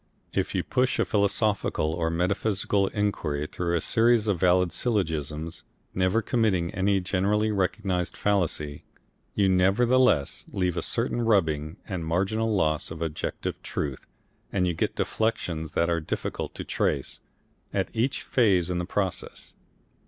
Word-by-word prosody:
If -, -, -1 dB
you -, -, +1 dB
push 125 Hz, 0 st, +1 dB
a -, -, +2 dB
philosophical 100 Hz, -6 st, +1 dB
or 80 Hz, -1 st, 0 dB
metaphysical 100 Hz, +3 st, +1 dB
inquiry 85 Hz, -9 st, -1 dB
through 85 Hz, +2 st, -2 dB
a 85 Hz, -, +1 dB
series 115 Hz, +2 st, +3 dB
of 100 Hz, -5 st, 0 dB
valid 90 Hz, -1 st, +3 dB
syllogisms 80 Hz, -, -2 dB, 0.3 s
never 95 Hz, +4 st, +1 dB
committing 100 Hz, -8 st, +1 dB
any 95 Hz, +1 st, +2 dB
generally 100 Hz, +4 st, +1 dB
recognised 95 Hz, -2 st, -1 dB
fallacy 80 Hz, -7 st, 0 dB, 0.5 s
you 100 Hz, -2 st, +3 dB
nevertheless 95 Hz, -, +3 dB
leave 90 Hz, -2 st, 0 dB
a 85 Hz, -, -1 dB
certain 120 Hz, +4 st, -1 dB
rubbing 80 Hz, -9 st, +1 dB
and 90 Hz, -4 st, -3 dB
marginal 100 Hz, +7 st, 0 dB
loss 80 Hz, -7 st, +1 dB
of 80 Hz, -, -7 dB
objective 80 Hz, -2 st, -3 dB
truth 70 Hz, -4 st, -4 dB, 0.4 s
and 90 Hz, -2 st, +1 dB
you 90 Hz, -, +1 dB
get -, -, -1 dB
deflections 85 Hz, -8 st, -1 dB
that 85 Hz, -, +2 dB
are 85 Hz, -1 st, +1 dB
difficult 75 Hz, -, -4 dB
to -, -, -4 dB
trace, 70 Hz, -, -1 dB, 0.5 s
at 95 Hz, -1 st, -1 dB
each 120 Hz, +5 st, 0 dB
phase 95 Hz, -8 st, +2 dB
in 90 Hz, -, -1 dB
the 90 Hz, -, -2 dB
process. 95 Hz, -2 st, -4 dB
95 Hz, 140 wpm, -26 LUFS, 85-105 Hz, 0.5 s, series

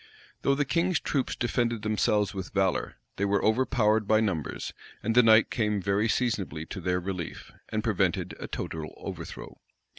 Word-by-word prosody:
Though 140 Hz, -, +3 dB
the 145 Hz, +1 st, +1 dB
king's 170 Hz, +2 st, +1 dB
troops 135 Hz, -1 st, -1 dB
defended 120 Hz, -2 st, 0 dB
themselves 105 Hz, -1 st, +1 dB
with 95 Hz, -2 st, -6 dB
valor, 95 Hz, -2 st, +1 dB, 0.2 s
they 100 Hz, -, +1 dB
were 100 Hz, 0 st, +1 dB
overpowered 110 Hz, -2 st, +2 dB
by 110 Hz, 0 st, +5 dB
numbers; 95 Hz, -10 st, -2 dB, 0.3 s
and 115 Hz, -, +1 dB
the 125 Hz, -, +7 dB
night 110 Hz, -1 st, +6 dB
came 105 Hz, -3 st, +1 dB
very 100 Hz, +3 st, +1 dB
seasonably 105 Hz, -9 st, -1 dB
to 95 Hz, -, -5 dB
their 90 Hz, +1 st, +1 dB
relief, 90 Hz, -2 st, -5 dB, 0.2 s
and -, -, -2 dB
prevented -, -, 0 dB
a -, -, -5 dB
total 80 Hz, -1 st, -5 dB
overthrow. -, -, -8 dB
105 Hz, 160 wpm, -28 LUFS, 95-120 Hz, 0.3 s, the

